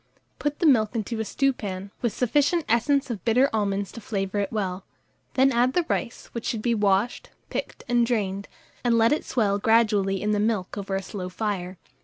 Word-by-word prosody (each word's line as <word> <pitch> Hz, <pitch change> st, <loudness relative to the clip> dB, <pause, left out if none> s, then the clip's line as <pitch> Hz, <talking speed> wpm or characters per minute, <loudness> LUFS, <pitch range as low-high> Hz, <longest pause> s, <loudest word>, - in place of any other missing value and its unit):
Put 295 Hz, 0 st, -1 dB
the 345 Hz, -, 0 dB
milk 225 Hz, -7 st, +4 dB
into 225 Hz, +1 st, -2 dB
a -, -, 0 dB
stewpan, 205 Hz, -7 st, -2 dB
with 235 Hz, -, +1 dB
sufficient 290 Hz, -, +1 dB
essence 270 Hz, +4 st, +2 dB
of 210 Hz, -6 st, -5 dB
bitter 250 Hz, +5 st, +3 dB
almonds 200 Hz, -3 st, 0 dB
to 230 Hz, -, -9 dB
flavour 205 Hz, -3 st, -2 dB
it 200 Hz, -1 st, -1 dB
well; 190 Hz, -3 st, -2 dB, 0.5 s
then 270 Hz, +1 st, +5 dB
add 250 Hz, +1 st, +2 dB
the 355 Hz, -2 st, +1 dB
rice, 235 Hz, -, -2 dB
which 235 Hz, -, -5 dB
should 220 Hz, -2 st, -2 dB
be 240 Hz, -, +2 dB
washed, 205 Hz, +1 st, +1 dB, 0.2 s
picked, -, -, -4 dB
and 240 Hz, 0 st, +3 dB
drained, 200 Hz, -5 st, -1 dB, 0.4 s
and 240 Hz, -2 st, +3 dB
let 225 Hz, 0 st, +4 dB
it 300 Hz, -, -1 dB
swell 205 Hz, -5 st, +1 dB
gradually 210 Hz, -3 st, +3 dB
in 210 Hz, +2 st, 0 dB
the 210 Hz, -, +1 dB
milk 210 Hz, -3 st, 0 dB
over 200 Hz, -1 st, -3 dB
a 195 Hz, -, -2 dB
slow 185 Hz, -1 st, -5 dB
fire. 185 Hz, -2 st, -3 dB
220 Hz, 195 wpm, -25 LUFS, 200-240 Hz, 0.5 s, then